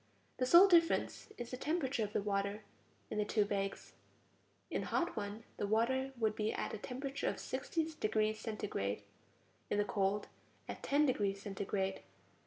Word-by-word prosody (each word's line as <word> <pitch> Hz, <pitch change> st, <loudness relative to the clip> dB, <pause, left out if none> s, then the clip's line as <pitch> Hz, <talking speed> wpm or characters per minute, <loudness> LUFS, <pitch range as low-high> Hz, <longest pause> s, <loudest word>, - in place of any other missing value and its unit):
The 255 Hz, -, +1 dB
sole 345 Hz, +8 st, +9 dB
difference 340 Hz, -2 st, +3 dB
is 240 Hz, -1 st, -6 dB
the 255 Hz, -, -3 dB
temperature 280 Hz, -5 st, 0 dB
of 205 Hz, -, -3 dB
the 205 Hz, -, 0 dB
water 200 Hz, +1 st, -1 dB, 0.5 s
in 215 Hz, -, -1 dB
the -, -, +3 dB
two 210 Hz, 0 st, +2 dB
bags; 195 Hz, -1 st, -3 dB, 0.8 s
in -, -, 0 dB
the -, -, -5 dB
hot 350 Hz, 0 st, 0 dB
one, 210 Hz, +1 st, -4 dB
the 205 Hz, -, -1 dB
water 260 Hz, +5 st, +2 dB
would 220 Hz, -2 st, +1 dB
be 215 Hz, 0 st, 0 dB
at -, -, -3 dB
a 220 Hz, -, -4 dB
temperature 270 Hz, +4 st, -3 dB
of -, -, -4 dB
sixty 325 Hz, -2 st, -1 dB
degrees 215 Hz, 0 st, +1 dB
centigrade; 105 Hz, -, -3 dB, 0.7 s
in -, -, +1 dB
the 205 Hz, -, +2 dB
cold, 200 Hz, 0 st, +1 dB, 0.4 s
at -, -, -6 dB
ten 290 Hz, +2 st, +3 dB
degrees 205 Hz, -7 st, +1 dB
centigrade. 195 Hz, -1 st, -2 dB
215 Hz, 170 wpm, -36 LUFS, 205-260 Hz, 0.8 s, sole